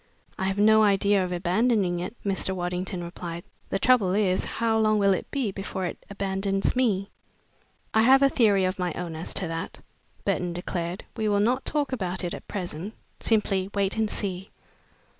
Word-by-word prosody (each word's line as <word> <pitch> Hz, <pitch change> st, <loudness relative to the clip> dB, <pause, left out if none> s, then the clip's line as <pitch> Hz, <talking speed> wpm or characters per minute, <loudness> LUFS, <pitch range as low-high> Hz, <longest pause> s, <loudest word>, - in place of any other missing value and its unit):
"I 190 Hz, -, 0 dB
have 195 Hz, +1 st, -1 dB
no 220 Hz, +1 st, +6 dB
idea 200 Hz, -1 st, +3 dB
of 180 Hz, -, -3 dB
abandoning 185 Hz, +1 st, +1 dB
it," 185 Hz, +6 st, -5 dB
Mr. 190 Hz, -1 st, 0 dB
Waddington 180 Hz, 0 st, -3 dB
replied. 170 Hz, 0 st, -6 dB, 0.3 s
"The -, -, 0 dB
trouble 200 Hz, -4 st, +3 dB
is, 190 Hz, -3 st, +2 dB
how 225 Hz, -1 st, 0 dB
long 215 Hz, -1 st, +3 dB
will 200 Hz, -1 st, +4 dB
it 185 Hz, -, -4 dB
be 260 Hz, -7 st, -1 dB
before 190 Hz, -1 st, -4 dB
it 175 Hz, -, -6 dB
abandons 195 Hz, 0 st, -1 dB
me?" 205 Hz, -6 st, +1 dB, 0.8 s
"I 220 Hz, -, +5 dB
have 265 Hz, +4 st, +6 dB
a -, -, +7 dB
theory 205 Hz, -7 st, +3 dB
of 185 Hz, +1 st, -2 dB
my 180 Hz, -2 st, -1 dB
own 175 Hz, -2 st, -5 dB
as 160 Hz, -, -4 dB
to 185 Hz, -, 0 dB
that," 165 Hz, +1 st, -5 dB, 0.5 s
Burton 175 Hz, -1 st, 0 dB
declared. 175 Hz, 0 st, -4 dB
"We 220 Hz, -2 st, -1 dB
will 205 Hz, -1 st, +2 dB
not 245 Hz, +6 st, +1 dB
talk 290 Hz, -2 st, -1 dB
about 190 Hz, -7 st, -2 dB
it 175 Hz, -, -2 dB
at -, -, -8 dB
present 185 Hz, +1 st, -5 dB, 0.2 s
simply 195 Hz, -4 st, +1 dB
wait 200 Hz, -1 st, +1 dB
and 220 Hz, -1 st, 0 dB
see." 190 Hz, -2 st, -3 dB
195 Hz, 180 wpm, -26 LUFS, 180-215 Hz, 0.8 s, a